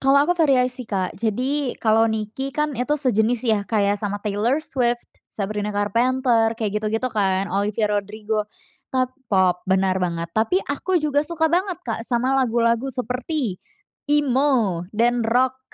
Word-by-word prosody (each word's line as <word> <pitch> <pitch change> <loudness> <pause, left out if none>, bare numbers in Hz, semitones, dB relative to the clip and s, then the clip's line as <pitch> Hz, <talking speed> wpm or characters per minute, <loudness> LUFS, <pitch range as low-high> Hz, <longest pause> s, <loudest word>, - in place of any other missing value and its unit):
Kalo 270 +1 +4
aku 350 - +2
variasi 255 -7 +1
Kak, 190 -3 -1
jadi 250 +6 -1
kalo 225 0 +3
Niki 220 +5 -3
kan 300 0 0
itu 265 +4 0
sejenis 240 -3 +1
ya, 220 -3 +2
kaya 205 -2 +2
sama 205 -1 -2
Taylor 210 +6 +1
Swift, 240 -2 0 0.2
Sabrina 210 0 -3
Carpenter, 230 +2 +1
kaya 220 -2 -1
gitu-gitu 215 +3 -1
kan, 195 -3 0
Olivia 205 +2 0
Rodrigo 210 +1 -2 0.4
top 255 -1 0 0.2
pop, 185 -3 +2
bener 190 0 +2
banget, 170 -2 -1
tapi 220 - +1
aku 360 +6 -1
juga 300 -3 +1
suka 320 +1 -1
banget 370 +1 +1
Kak 225 -1 -3
sama 250 +2 +1
lagu-lagu 235 -1 +2
seperti 250 - -3 0.5
Emo 260 -11 +2
dan 240 +2 +2
Rock. 255 +3 +1
230 Hz, 145 wpm, -22 LUFS, 210-260 Hz, 0.5 s, Kalo